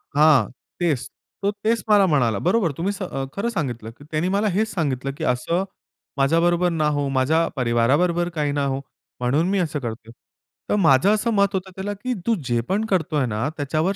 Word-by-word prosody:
हां, 145 Hz, -7 st, +5 dB, 0.3 s
तेच. 160 Hz, -8 st, 0 dB, 0.3 s
तो 200 Hz, -, +2 dB
तेच 230 Hz, +1 st, +1 dB
मला 205 Hz, -2 st, +6 dB
म्हणाला. 120 Hz, -8 st, +2 dB
बरोबर, 185 Hz, -4 st, +2 dB
तुम्ही 190 Hz, +5 st, -1 dB
स 200 Hz, -, -9 dB
अ, 135 Hz, -6 st, -4 dB
खरं 220 Hz, +4 st, -1 dB
सांगितलं 120 Hz, -, -3 dB
की 145 Hz, -, -15 dB
त्यानी 155 Hz, +3 st, 0 dB
मला 200 Hz, +3 st, +1 dB
हेच 215 Hz, +4 st, 0 dB
सांगितलं, 135 Hz, -6 st, -1 dB
"की -, -, -5 dB
असं 165 Hz, +9 st, 0 dB, 0.5 s
माझ्याबरोबर 170 Hz, +5 st, +3 dB
ना 160 Hz, -3 st, 0 dB
हो, 145 Hz, -1 st, 0 dB
माझ्या 160 Hz, +6 st, +2 dB
परिवाराबरोबर 140 Hz, +9 st, +2 dB
काही 150 Hz, -2 st, 0 dB
ना 145 Hz, -1 st, 0 dB
हो, 135 Hz, -1 st, -1 dB, 0.4 s
म्हणून 135 Hz, +7 st, +1 dB
मी 200 Hz, -, +1 dB
असं 155 Hz, -4 st, -1 dB
करतोय". 115 Hz, -2 st, -7 dB, 0.6 s
तर -, -, +2 dB
माझं 165 Hz, -3 st, +4 dB
असं 225 Hz, +2 st, 0 dB
मत 200 Hz, -1 st, +2 dB
होतं 190 Hz, 0 st, -3 dB
त्याला 195 Hz, +2 st, -3 dB
की 250 Hz, +5 st, -3 dB
तू 230 Hz, -, +3 dB
जे 120 Hz, -1 st, +1 dB
पण 210 Hz, +4 st, +1 dB
करतोय 160 Hz, -8 st, 0 dB
ना, 110 Hz, +2 st, -2 dB
त्याच्यावर 155 Hz, +6 st, 0 dB
160 Hz, 190 wpm, -22 LUFS, 135-195 Hz, 0.6 s, मला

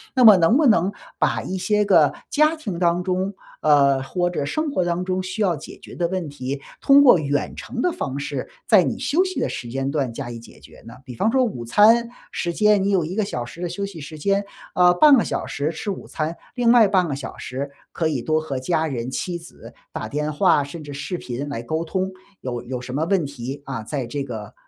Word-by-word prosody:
那 255 Hz, -, +4 dB
么 215 Hz, -2 st, +10 dB
能 180 Hz, +8 st, +4 dB
不 305 Hz, -, +3 dB
能 195 Hz, -6 st, +4 dB, 0.3 s
把 -, -, +1 dB
一 190 Hz, -, -4 dB
些 210 Hz, +3 st, +1 dB
个 165 Hz, -7 st, +5 dB, 0.2 s
家 305 Hz, +2 st, +3 dB
庭 210 Hz, -, -5 dB
当 175 Hz, 0 st, +2 dB
中， 185 Hz, +2 st, -1 dB, 0.3 s
呃， 140 Hz, -3 st, +4 dB
或者 175 Hz, +3 st, -1 dB
生 310 Hz, -, -2 dB
活 185 Hz, -, +1 dB
当 175 Hz, +1 st, -1 dB
中 185 Hz, 0 st, -1 dB
需 185 Hz, +3 st, -6 dB
要 185 Hz, -5 st, +2 dB
解 150 Hz, -, -10 dB
决 -, -, -13 dB
的 175 Hz, -, 0 dB
问 185 Hz, -2 st, -3 dB
题， 140 Hz, 0 st, -5 dB, 0.2 s
通 280 Hz, +1 st, +7 dB
过 250 Hz, -8 st, +8 dB
远 145 Hz, -1 st, -2 dB
程 245 Hz, -, -5 dB
的 360 Hz, -, +2 dB
方 140 Hz, -, -4 dB
式 140 Hz, -, -4 dB, 0.2 s
在 -, -, +6 dB
你 -, -, -2 dB
休 335 Hz, +6 st, +2 dB
息 370 Hz, -1 st, -3 dB
的 -, -, 0 dB
时 120 Hz, -, -6 dB
间 135 Hz, +2 st, -2 dB
段 140 Hz, -5 st, -1 dB
加 125 Hz, +1 st, -6 dB
以 115 Hz, -, -7 dB
解 115 Hz, -, -15 dB
决 -, -, -16 dB
呢？ 115 Hz, -, -10 dB
比 125 Hz, -, -8 dB
方 215 Hz, -, +1 dB
说 260 Hz, +1 st, +3 dB
午 205 Hz, -, -3 dB
餐 225 Hz, -, +5 dB, 0.2 s
时 170 Hz, -1 st, -2 dB
间 210 Hz, 0 st, +3 dB
你 200 Hz, -, +1 dB
有 190 Hz, -5 st, +2 dB
1 175 Hz, +4 st, -5 dB
个 215 Hz, -, +1 dB
小 125 Hz, -11 st, -4 dB
时 170 Hz, +8 st, -11 dB
的 175 Hz, -, -2 dB
休 200 Hz, +3 st, -3 dB
息 190 Hz, -5 st, -8 dB
时 155 Hz, +2 st, -8 dB
间， 200 Hz, +6 st, 0 dB, 0.3 s
呃， 180 Hz, 0 st, +5 dB
半 290 Hz, +9 st, +7 dB
个 235 Hz, -, +3 dB
小 -, -, -3 dB
时 145 Hz, +3 st, -2 dB
吃 170 Hz, +6 st, -4 dB
午 190 Hz, -, -7 dB
餐， 155 Hz, +2 st, -3 dB, 0.2 s
另 240 Hz, -2 st, +3 dB
外 235 Hz, -3 st, +7 dB
半 185 Hz, -3 st, +2 dB
个 145 Hz, -, -2 dB
小 140 Hz, -, -7 dB
时 135 Hz, +2 st, -5 dB, 0.2 s
可 165 Hz, -, -1 dB
以 145 Hz, -6 st, -1 dB
多 155 Hz, 0 st, +1 dB
和 140 Hz, -4 st, -4 dB
家 160 Hz, +4 st, 0 dB
人 125 Hz, -4 st, -3 dB
妻 175 Hz, +6 st, -3 dB
子 170 Hz, -, -13 dB, 0.2 s
打 -, -, -5 dB
电 150 Hz, +1 st, -2 dB
话， 165 Hz, -2 st, +3 dB
甚 150 Hz, +3 st, -8 dB
至 145 Hz, -1 st, -8 dB
视 145 Hz, +6 st, -4 dB
频 135 Hz, 0 st, -5 dB
来 115 Hz, -4 st, -4 dB
沟 160 Hz, +7 st, -2 dB
通。 185 Hz, +3 st, -2 dB, 0.3 s
有 120 Hz, -2 st, -4 dB
有 125 Hz, +1 st, -5 dB
什 125 Hz, 0 st, -7 dB
么 150 Hz, +4 st, 0 dB
问 180 Hz, -2 st, +1 dB
题， 140 Hz, 0 st, -7 dB
啊， 130 Hz, -4 st, -4 dB
在 135 Hz, +3 st, -3 dB
这 140 Hz, +4 st, -4 dB
个 110 Hz, -5 st, -7 dB
170 Hz, 260 characters per minute, -22 LUFS, 140-200 Hz, 0.3 s, 么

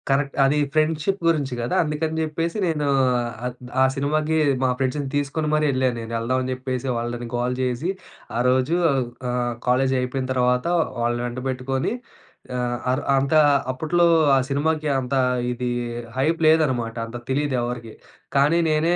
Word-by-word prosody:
Correct. 140 Hz, 0 st, +1 dB
అది 135 Hz, +2 st, +3 dB, 0.2 s
friendship 155 Hz, +5 st, +1 dB
గురించి 145 Hz, -6 st, +1 dB
గదా. 120 Hz, -, -1 dB
అందుకని 155 Hz, +1 st, -2 dB
జెప్పేసి 165 Hz, +4 st, -2 dB
నేను 150 Hz, -3 st, -1 dB, 0.6 s
ఆహ్, 125 Hz, -, -2 dB, 0.3 s
ఆ! -, -, +7 dB
సినిమాకి 155 Hz, +3 st, 0 dB, 0.3 s
మా 130 Hz, -, +3 dB
ఫ్రెండ్స్‌ని 135 Hz, +1 st, -1 dB
తీసుకొని 145 Hz, +2 st, -1 dB
మరి 155 Hz, 0 st, +2 dB
ఎళ్ళాను 130 Hz, -1 st, +1 dB
నేను. 115 Hz, 0 st, -7 dB
ఎళ్దాం 130 Hz, +3 st, 0 dB
అని 130 Hz, -, -3 dB
జెప్పేసి 130 Hz, 0 st, -4 dB
వాళ్ళని 120 Hz, 0 st, -4 dB
గోల 120 Hz, +1 st, 0 dB
చేసి 130 Hz, +6 st, -1 dB, 0.5 s
ఆరోజు 130 Hz, +5 st, +2 dB, 0.5 s
ఆహ్, 120 Hz, -1 st, -1 dB
కాలేజి 130 Hz, +1 st, +2 dB
అయిపోయిన 130 Hz, +1 st, -2 dB
తర్వాత 125 Hz, +1 st, +1 dB, 0.4 s
వాళ్ళని 120 Hz, 0 st, 0 dB
వెంటపెట్టుకొని, 130 Hz, +1 st, -2 dB, 0.7 s
ఆహ్, 120 Hz, 0 st, -1 dB
అర్ 130 Hz, +3 st, -1 dB
అంత 135 Hz, +2 st, 0 dB, 0.4 s
అప్పట్లో 170 Hz, +6 st, +2 dB, 0.3 s
ఆ! -, -, +4 dB
సినిమాకి 150 Hz, +2 st, 0 dB
అంత 130 Hz, +1 st, -4 dB, 0.4 s
ఇది 125 Hz, 0 st, -3 dB, 0.5 s
హైప్ 160 Hz, +5 st, +1 dB
లేదనమాట. 130 Hz, -8 st, +2 dB
అంత 115 Hz, -, -10 dB, 0.2 s
తెలీదు 145 Hz, 0 st, 0 dB
ఎవరికీ. 120 Hz, -2 st, -5 dB, 0.4 s
కానీ 150 Hz, +5 st, +4 dB
నేనే 160 Hz, +3 st, +2 dB
135 Hz, 140 wpm, -23 LUFS, 125-155 Hz, 0.7 s, ఆ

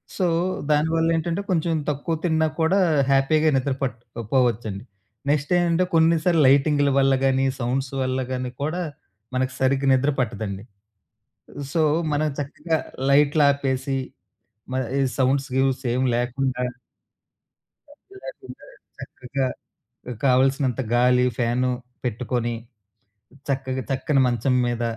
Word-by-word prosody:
So, 185 Hz, -, 0 dB, 0.5 s
దానివల్ల 160 Hz, +2 st, +2 dB
ఏంటంటే, 165 Hz, +3 st, -1 dB
కొంచెం 165 Hz, -1 st, +1 dB, 0.2 s
తక్కువ 150 Hz, +3 st, -2 dB
తిన్నా 160 Hz, -2 st, +2 dB
కూడా 170 Hz, +5 st, +3 dB, 0.3 s
హ్యాపీగా 155 Hz, +3 st, +3 dB
నిద్ర 135 Hz, +1 st, 0 dB
పట్టకపోవచ్చండి. 115 Hz, -3 st, -2 dB, 0.5 s
నెక్స్ట్ 145 Hz, +1 st, 0 dB
ఏంటంటే, 175 Hz, +1 st, +2 dB
కొన్నిసార్లు 165 Hz, 0 st, +3 dB
లైటింగ్‌ల 145 Hz, +1 st, +4 dB
వల్ల 135 Hz, 0 st, +4 dB
గాని, 135 Hz, 0 st, +2 dB
సౌండ్స్ 130 Hz, +2 st, -2 dB
వల్ల 130 Hz, 0 st, -1 dB
గాని 125 Hz, -1 st, -3 dB
కూడా 165 Hz, +5 st, -2 dB, 0.5 s
మనకు 130 Hz, 0 st, 0 dB
సరిగ్గా 135 Hz, +1 st, +1 dB
నిద్ర 130 Hz, +2 st, +2 dB
పట్టదండి. 105 Hz, -4 st, -3 dB, 1.1 s
సో, 165 Hz, -, +2 dB, 0.3 s
మనం 155 Hz, +1 st, +1 dB
చక్కగా 155 Hz, +3 st, -2 dB, 0.3 s
లైట్లు 145 Hz, +2 st, +4 dB
ఆపేసి, 135 Hz, -1 st, -1 dB, 0.8 s
మ -, -, -2 dB, 0.2 s
ఈ -, -, +3 dB, 0.2 s
సౌండ్స్, 135 Hz, +1 st, +1 dB
గీస్ 135 Hz, 0 st, +1 dB
ఏమి 130 Hz, +1 st, +1 dB
లేకుండా... 125 Hz, +1 st, -1 dB, 1.3 s
ఏమి 380 Hz, +7 st, -18 dB
లేకుండా -, -, -10 dB, 0.3 s
చక్కగా 130 Hz, +1 st, -4 dB, 0.8 s
కావలసినంత 135 Hz, 0 st, +2 dB
గాలి, 125 Hz, +1 st, +4 dB
ఫ్యాను 125 Hz, +1 st, +1 dB, 0.3 s
పెట్టుకొని 120 Hz, 0 st, -2 dB, 1.0 s
చక్కగా 130 Hz, -1 st, -2 dB
తక్కని 135 Hz, +1 st, +1 dB
మంచం 125 Hz, +2 st, 0 dB
మీద 120 Hz, 0 st, -2 dB
135 Hz, 110 wpm, -23 LUFS, 125-150 Hz, 1.3 s, లైటింగ్‌ల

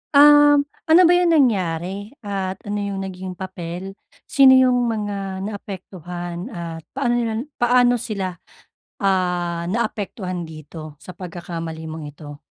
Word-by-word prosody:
Um, 290 Hz, 0 st, +8 dB, 0.2 s
ano 330 Hz, +3 st, +7 dB
ba 345 Hz, -, +6 dB
yung 340 Hz, -2 st, +4 dB
nangyari 200 Hz, -, 0 dB
at 195 Hz, -2 st, -4 dB
ano 205 Hz, -1 st, -3 dB
yung 200 Hz, -1 st, -3 dB
naging 185 Hz, -1 st, -6 dB
papel? 180 Hz, 0 st, -6 dB, 0.3 s
Sino 265 Hz, -2 st, +6 dB
yung 250 Hz, -2 st, +4 dB
mga 200 Hz, -3 st, -3 dB
naapektuhan 180 Hz, -3 st, -6 dB
at 170 Hz, -6 st, -6 dB
paano 255 Hz, -3 st, +1 dB
nila 230 Hz, 0 st, -1 dB, 0.2 s
paano 245 Hz, 0 st, +4 dB
sila, 195 Hz, -5 st, -3 dB, 0.7 s
ah, 180 Hz, -3 st, 0 dB
naapektuhan 200 Hz, -5 st, -3 dB
dito 155 Hz, 0 st, -10 dB
sa 185 Hz, -, -10 dB
pagkakamali 165 Hz, -3 st, -6 dB
mong 160 Hz, -1 st, -6 dB
ito? 145 Hz, 0 st, -11 dB
195 Hz, 125 wpm, -21 LUFS, 175-235 Hz, 0.7 s, Um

